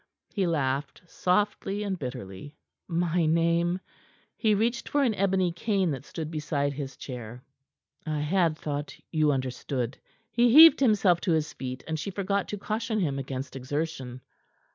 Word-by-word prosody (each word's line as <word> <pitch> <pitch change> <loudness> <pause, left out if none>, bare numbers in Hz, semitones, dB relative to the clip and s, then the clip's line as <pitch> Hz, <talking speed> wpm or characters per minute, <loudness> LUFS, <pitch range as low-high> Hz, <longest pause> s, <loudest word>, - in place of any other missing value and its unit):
he 195 -4 +1
laughed 140 -2 -1
softly 200 +3 0
and 195 -3 -3
bitterly. 125 -1 -7 0.3
"My 170 -1 +1
name?" 170 +2 +2 0.6
He 215 -2 +2
reached 235 +3 0
for 290 -1 +2
an 240 -5 +2
ebony 190 -2 +1
cane 190 0 0
that 135 0 -5
stood 160 -2 -6
beside 145 -2 -1
his 135 -1 -6
chair. 125 -1 -8 0.6
"I 155 -2 -2
had 165 0 +1
thought 145 -1 -4 0.2
you 155 -2 +3
understood." 130 -1 -3 0.3
He 240 +1 +4
heaved 320 +5 +10
himself 205 -9 +3
to 180 - +1
his 155 -1 0
feet, 130 0 -6
and 160 -1 -2
she 175 - -4
forgot 200 +1 -1
to 205 - -4
caution 220 +2 -2
him 140 -7 0
against 135 0 -5
exertion. 135 -2 -4
165 Hz, 150 wpm, -27 LUFS, 140-195 Hz, 0.6 s, heaved